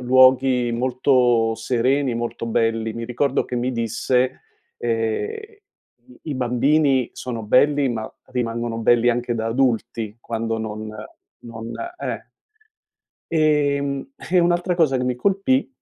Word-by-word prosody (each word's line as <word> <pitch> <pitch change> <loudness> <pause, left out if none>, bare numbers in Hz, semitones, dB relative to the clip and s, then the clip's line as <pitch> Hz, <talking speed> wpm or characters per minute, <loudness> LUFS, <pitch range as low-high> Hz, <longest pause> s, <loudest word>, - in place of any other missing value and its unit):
luoghi 130 -1 +4
molto 125 -2 +2
sereni, 125 +3 0
molto 115 0 -4
belli. 115 -1 0
Mi 115 0 -4
ricordo 125 +3 0
che 125 - -6
mi 125 +2 0
disse, 125 +2 0 0.4
ehm: 115 - -1
"I 425 -1 -16 0.7
i - - -2
bambini 130 +1 +2
sono 115 -3 -5
belli, 140 +5 +3
ma 110 -2 -4 0.2
rimangono 120 -2 -3
belli 120 +1 +3
anche 120 0 -1
da 110 0 -2
adulti 115 -3 -1
quando 115 0 -3
non 110 0 -5 0.5
non" 115 0 -8 0.3
eh. - - -4 1.1
Ehm, 145 - +1 0.2
e 185 - +4
un'altra 175 +1 +2
cosa 150 -6 +3
che 125 - -1
mi 125 -1 -1
colpì, 200 - +1
125 Hz, 125 wpm, -22 LUFS, 115-140 Hz, 1.1 s, luoghi